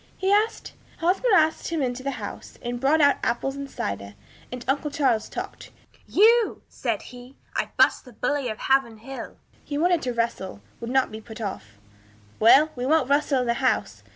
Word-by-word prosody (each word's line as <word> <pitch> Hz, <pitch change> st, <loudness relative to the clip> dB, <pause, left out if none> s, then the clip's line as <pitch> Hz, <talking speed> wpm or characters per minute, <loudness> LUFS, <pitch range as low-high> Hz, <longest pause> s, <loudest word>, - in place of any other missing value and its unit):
he 380 Hz, +1 st, 0 dB
asked. 425 Hz, +2 st, +1 dB, 0.2 s
Hosmer 375 Hz, +8 st, +1 dB
asked 315 Hz, 0 st, +2 dB
him 330 Hz, -1 st, -2 dB
into 250 Hz, 0 st, -2 dB
the 275 Hz, -, -2 dB
house, -, -, -8 dB
and 240 Hz, 0 st, -3 dB
brought 290 Hz, +5 st, +3 dB
out 285 Hz, -1 st, +5 dB
apples 270 Hz, +3 st, -1 dB
and 280 Hz, 0 st, -6 dB
cider, 100 Hz, -, -5 dB, 0.4 s
and 250 Hz, -1 st, -7 dB
uncle 285 Hz, +3 st, 0 dB
Charles 265 Hz, -7 st, +1 dB
talked. -, -, -7 dB, 0.4 s
'You!' 455 Hz, +3 st, +4 dB
said -, -, -3 dB
he, 250 Hz, +1 st, -12 dB, 0.2 s
'I -, -, -1 dB
burst -, -, +4 dB
the 250 Hz, -, -14 dB
bully 275 Hz, +2 st, -1 dB
of 215 Hz, -, -4 dB
Haverhill.' 265 Hz, -1 st, -1 dB, 0.3 s
He 290 Hz, -, -4 dB
wanted 345 Hz, +1 st, +2 dB
to 250 Hz, -, -2 dB
wrestle, 230 Hz, -, -2 dB, 0.2 s
would 235 Hz, -, -5 dB
not 265 Hz, -1 st, +2 dB
be 220 Hz, +1 st, -7 dB
put 220 Hz, 0 st, -11 dB
off. 110 Hz, -, -6 dB, 0.6 s
'Well, 280 Hz, +8 st, +6 dB
we 245 Hz, -, -4 dB
won't 285 Hz, 0 st, +2 dB
wrestle 285 Hz, -2 st, +2 dB
in -, -, -1 dB
the 235 Hz, -, +2 dB
house.' 260 Hz, -, 0 dB
265 Hz, 180 wpm, -25 LUFS, 235-305 Hz, 0.6 s, Well